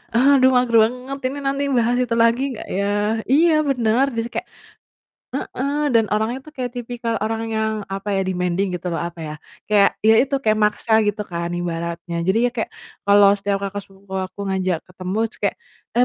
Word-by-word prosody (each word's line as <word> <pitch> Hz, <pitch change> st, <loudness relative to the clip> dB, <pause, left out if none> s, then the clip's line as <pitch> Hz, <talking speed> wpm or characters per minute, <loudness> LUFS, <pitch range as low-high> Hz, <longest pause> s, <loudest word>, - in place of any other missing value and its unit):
aduh 260 Hz, +1 st, +5 dB
mager 250 Hz, -2 st, +2 dB
banget 250 Hz, +4 st, -3 dB
ini 270 Hz, +2 st, -5 dB
nanti 275 Hz, +1 st, 0 dB
bahas 240 Hz, +1 st, +2 dB
itu 230 Hz, -1 st, -1 dB
lagi 230 Hz, +2 st, +3 dB
nggak 230 Hz, -, -8 dB
ya?" 200 Hz, -, 0 dB, 0.5 s
Iya 325 Hz, +4 st, +5 dB, 0.2 s
bener, 245 Hz, 0 st, +2 dB
jadi 230 Hz, -, -1 dB
kayak -, -, -4 dB, 0.9 s
heeh. 275 Hz, +2 st, -3 dB, 0.2 s
Dan 225 Hz, -1 st, +5 dB
orangnya 220 Hz, +4 st, 0 dB
tuh 305 Hz, -, -12 dB
kayak 250 Hz, -1 st, -3 dB
tipikal 240 Hz, -1 st, -3 dB
orang 225 Hz, +1 st, -2 dB
yang 220 Hz, 0 st, 0 dB, 0.2 s
apa 195 Hz, +1 st, -5 dB
ya? -, -, +2 dB
Demanding 180 Hz, +1 st, 0 dB
gitu 180 Hz, -, -9 dB
loh -, -, -2 dB
apa 175 Hz, -1 st, -12 dB
ya, -, -, -5 dB, 0.4 s
kayak 205 Hz, -2 st, +5 dB, 0.2 s
ya 220 Hz, -, +7 dB
itu 275 Hz, +1 st, -2 dB
kayak 215 Hz, 0 st, +3 dB
maksa 210 Hz, +2 st, 0 dB
gitu 205 Hz, 0 st, -1 dB
kan 170 Hz, 0 st, -3 dB
ibaratnya. 170 Hz, 0 st, -4 dB
Jadi 190 Hz, +4 st, +3 dB
ya -, -, 0 dB
kayak 225 Hz, -, -1 dB, 0.4 s
kalau 200 Hz, 0 st, +7 dB
setiap 200 Hz, 0 st, 0 dB
kakak 200 Hz, +1 st, -4 dB
sepupu 195 Hz, 0 st, -17 dB
aku 185 Hz, +2 st, -26 dB
ngajak 185 Hz, -3 st, 0 dB
ketemu 185 Hz, +1 st, -5 dB
terus -, -, -20 dB
kayak, -, -, 0 dB, 0.4 s
"Eee, 245 Hz, -, +6 dB
220 Hz, 185 wpm, -21 LUFS, 190-245 Hz, 0.9 s, ya